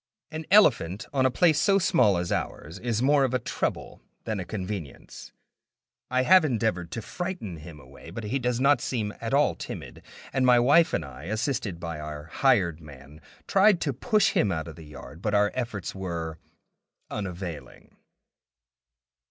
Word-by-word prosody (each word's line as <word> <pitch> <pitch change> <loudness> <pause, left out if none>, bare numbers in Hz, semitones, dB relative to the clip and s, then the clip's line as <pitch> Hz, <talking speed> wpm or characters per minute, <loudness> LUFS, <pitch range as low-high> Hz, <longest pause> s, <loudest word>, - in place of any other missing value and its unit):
An 155 0 -6
elephant 115 - +4
on 130 -2 +3
a - - +1
place 155 +3 +3
so 195 +2 +4
small 125 - +3
as 85 0 -3
ours 80 +3 -4
is 120 -1 -1
more 140 +1 +4
of 130 -1 0
a - - +1
trouble - - -4 0.2
than 110 -3 -3
a 90 - -4
convenience. 95 -6 -7 0.8
I 130 0 +2
have 185 +5 +6
endeavored 110 - -1
to 115 - -5
frighten 175 - -5
him 75 0 -11
away, 70 +3 -14
but 110 +7 -7
he 110 +6 -1
does 125 -1 -1
not 140 -1 +4
seem 110 -5 -2
at 115 - -3
all 145 +2 +3
timid, - - -8 0.3
and 130 - +1
my 125 -1 +6
wife 145 +7 +4
and 80 - -1
I, 70 +2 -11
assisted 110 - -2
by 85 -2 -5
our 75 -1 -6
hired 85 - +1
man, 70 0 -14 0.2
tried 195 -1 +4
to 140 - 0
push 210 - +2
him 170 - +2
out 80 -1 -3
of 80 - -9
the 80 -3 -12
yard, 75 +3 -11
but 105 0 0
our 105 0 +3
efforts 115 -7 -4
were 85 -4 -5 0.7
unavailing. 85 -9 -7
105 Hz, 170 wpm, -26 LUFS, 85-135 Hz, 0.8 s, have